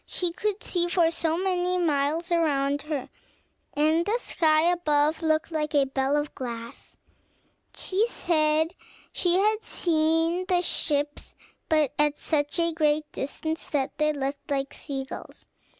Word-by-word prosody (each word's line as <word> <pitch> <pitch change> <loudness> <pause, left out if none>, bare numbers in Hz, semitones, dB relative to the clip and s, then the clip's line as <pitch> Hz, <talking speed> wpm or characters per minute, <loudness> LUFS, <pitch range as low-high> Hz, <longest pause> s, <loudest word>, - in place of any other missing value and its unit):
She 355 -2 -1
could 415 +4 -2
see 350 -1 0
for 340 -2 +3
so 330 -1 0
many 365 -1 0
miles 320 0 0
around 285 -4 +1
her, 295 -3 -4 0.7
and 310 +3 +3
the 420 +6 +1
sky 315 -9 +2
above 315 -3 +2
looked 315 +1 +1
like 305 -1 -1
a 280 -1 +5
bell 270 +1 0
of 295 0 -2
glass. 235 -3 -8 0.8
She 405 +5 0
had 350 +4 0
seen 325 0 +1
the 355 -1 +2
ships, 290 -3 -2 0.3
but 305 -3 +2
at 295 0 +2
such 295 0 0
a 335 -1 +1
great 305 -1 +1
distance 315 +3 -4
that 275 -2 -1
they 305 0 +3
looked 280 -1 -4
like 275 -1 -1
sea 275 -3 -5
gulls. - - -10
315 Hz, 135 wpm, -26 LUFS, 290-345 Hz, 0.8 s, a